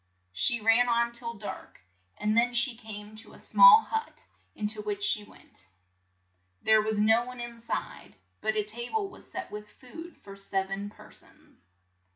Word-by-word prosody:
She 235 Hz, -, +5 dB
ran 225 Hz, +3 st, +4 dB
on 235 Hz, 0 st, +2 dB
till 235 Hz, -1 st, -4 dB
dark, 205 Hz, -1 st, -9 dB, 0.4 s
and 210 Hz, +1 st, 0 dB
then 240 Hz, +1 st, +2 dB
she 240 Hz, 0 st, +2 dB
came 215 Hz, -1 st, -9 dB
to 220 Hz, -, -11 dB
a -, -, -14 dB
small 465 Hz, -3 st, +7 dB
hut, 445 Hz, 0 st, -5 dB, 0.3 s
in 210 Hz, -, -4 dB
to 215 Hz, 0 st, -1 dB
which 205 Hz, -1 st, -4 dB
she 210 Hz, -, +2 dB
went. 95 Hz, -, -20 dB, 1.0 s
There 220 Hz, 0 st, +5 dB
was 215 Hz, 0 st, -1 dB
no 220 Hz, +3 st, +4 dB
one 250 Hz, 0 st, -9 dB
in 240 Hz, -1 st, -6 dB
side, 230 Hz, -, -6 dB, 0.3 s
but 215 Hz, 0 st, -1 dB
a 215 Hz, -, +1 dB
ta 235 Hz, +3 st, -3 dB
ble 435 Hz, -3 st, -1 dB
was 375 Hz, -, -14 dB
set -, -, -6 dB
with 210 Hz, 0 st, -8 dB
food 325 Hz, +9 st, -12 dB
for 195 Hz, -1 st, -12 dB
sev 195 Hz, -1 st, -2 dB
en 200 Hz, +1 st, -4 dB
per -, -, -16 dB
sons. -, -, -11 dB
220 Hz, 185 wpm, -28 LUFS, 210-240 Hz, 1.0 s, small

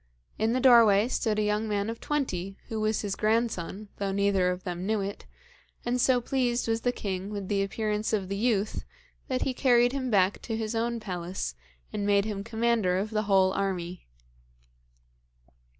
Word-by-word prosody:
In 220 Hz, +2 st, +2 dB
the 255 Hz, -, +1 dB
doorway 230 Hz, -5 st, +6 dB
stood 220 Hz, -4 st, 0 dB
a 215 Hz, -, +2 dB
young 210 Hz, +1 st, 0 dB
man 205 Hz, -1 st, -1 dB
of 230 Hz, 0 st, -4 dB
twenty, 195 Hz, -10 st, -2 dB
who 220 Hz, -, -3 dB
was 215 Hz, 0 st, +1 dB
his 200 Hz, -2 st, -3 dB
grandson, 215 Hz, -3 st, -1 dB
though 200 Hz, -1 st, -2 dB
neither 195 Hz, -2 st, +2 dB
of 180 Hz, 0 st, -3 dB
them 180 Hz, +1 st, -4 dB
knew 220 Hz, 0 st, +1 dB
it, 200 Hz, +1 st, -6 dB, 0.6 s
and 245 Hz, +1 st, +1 dB
so 255 Hz, -1 st, +4 dB
pleased 245 Hz, -1 st, 0 dB
was 225 Hz, 0 st, 0 dB
the 245 Hz, -, +1 dB
king 195 Hz, -4 st, -4 dB
with 200 Hz, -2 st, -5 dB
the 200 Hz, -1 st, +1 dB
appearance 210 Hz, +1 st, -1 dB
of 200 Hz, -4 st, 0 dB
the 195 Hz, -, -3 dB
youth, 215 Hz, -1 st, 0 dB, 0.4 s
that 255 Hz, -1 st, -1 dB
he 265 Hz, -, -1 dB
carried 245 Hz, -2 st, +4 dB
him 265 Hz, -1 st, -2 dB
back 195 Hz, -3 st, +2 dB
to 225 Hz, -2 st, -3 dB
his 220 Hz, 0 st, -3 dB
own 235 Hz, +1 st, -1 dB
palace, 180 Hz, -, -4 dB, 0.4 s
and 205 Hz, -1 st, -2 dB
made 200 Hz, 0 st, +3 dB
him 205 Hz, -2 st, -3 dB
commander 225 Hz, -4 st, +1 dB
of 205 Hz, +3 st, -2 dB
the 215 Hz, -1 st, +1 dB
whole 190 Hz, -1 st, +4 dB
army. 180 Hz, -3 st, -3 dB
210 Hz, 180 wpm, -28 LUFS, 195-230 Hz, 0.6 s, doorway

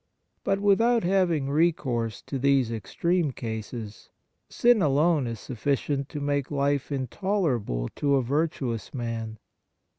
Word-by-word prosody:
But 195 Hz, -, +1 dB
without 225 Hz, +3 st, +3 dB
having 175 Hz, -7 st, +1 dB
recourse 130 Hz, -8 st, 0 dB
to 135 Hz, -, -4 dB
these 135 Hz, -3 st, +3 dB
extreme 165 Hz, -, 0 dB
cases, 110 Hz, -2 st, -6 dB, 0.4 s
sin 240 Hz, -3 st, +4 dB
alone 150 Hz, -1 st, +3 dB
is 115 Hz, -2 st, -5 dB
sufficient 135 Hz, +3 st, -2 dB
to 150 Hz, -, -5 dB
make 145 Hz, -1 st, -1 dB
Hfe 140 Hz, -1 st, 0 dB, 0.2 s
intoler 185 Hz, -, 0 dB
able -, -, -3 dB
to 140 Hz, -1 st, +2 dB
a 135 Hz, -, +2 dB
virtuous 130 Hz, -5 st, -2 dB
man. 115 Hz, -2 st, -4 dB
140 Hz, 125 wpm, -26 LUFS, 115-165 Hz, 0.4 s, sin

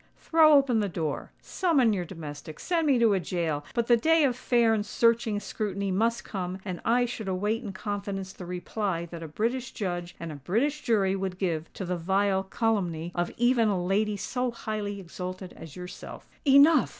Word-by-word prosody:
Throw 320 Hz, -2 st, +5 dB
open 270 Hz, -5 st, +4 dB
the 205 Hz, -2 st, 0 dB
door—summon 230 Hz, -, 0 dB
your 180 Hz, -3 st, -2 dB
domestics—send 165 Hz, -, -3 dB
me 275 Hz, -3 st, +4 dB
to 230 Hz, -3 st, +4 dB
a 195 Hz, -, +2 dB
gaol!—but 170 Hz, +4 st, -2 dB
the 240 Hz, -, +5 dB
day 320 Hz, +7 st, +4 dB
of 260 Hz, -4 st, +2 dB
fair 240 Hz, -2 st, +3 dB
and 215 Hz, -2 st, +1 dB
searching 225 Hz, 0 st, +2 dB
scrutiny 200 Hz, -2 st, -3 dB
must 230 Hz, +5 st, +1 dB
come—and 185 Hz, -1 st, -5 dB
I 245 Hz, +2 st, +3 dB
should 225 Hz, -3 st, -5 dB
await 205 Hz, +5 st, 0 dB
in 215 Hz, -6 st, -5 dB
confidence 195 Hz, -1 st, -4 dB
the 180 Hz, -, -9 dB
reply 180 Hz, 0 st, -2 dB
that 170 Hz, 0 st, -9 dB
a 165 Hz, -, -6 dB
British 235 Hz, -, -2 dB
judge 175 Hz, -3 st, -4 dB
and 165 Hz, -1 st, -5 dB
a -, -, -6 dB
British 240 Hz, -, 0 dB
jury 200 Hz, -6 st, +2 dB
would 190 Hz, -2 st, -3 dB
give 165 Hz, -4 st, -2 dB
to 190 Hz, -, -5 dB
the 180 Hz, 0 st, -2 dB
vile 190 Hz, +3 st, +1 dB
calumny 190 Hz, -5 st, -1 dB
of 175 Hz, 0 st, -1 dB
even 240 Hz, -1 st, +3 dB
a 200 Hz, -3 st, +1 dB
lady 205 Hz, +2 st, +1 dB
so 250 Hz, +5 st, -2 dB
highly 215 Hz, -3 st, -4 dB
exalted 185 Hz, +1 st, -7 dB
as 160 Hz, -3 st, -11 dB
yourself!" 180 Hz, 0 st, -9 dB, 0.2 s
"Enough!" 280 Hz, +2 st, +6 dB
200 Hz, 175 wpm, -28 LUFS, 180-235 Hz, 0.2 s, Enough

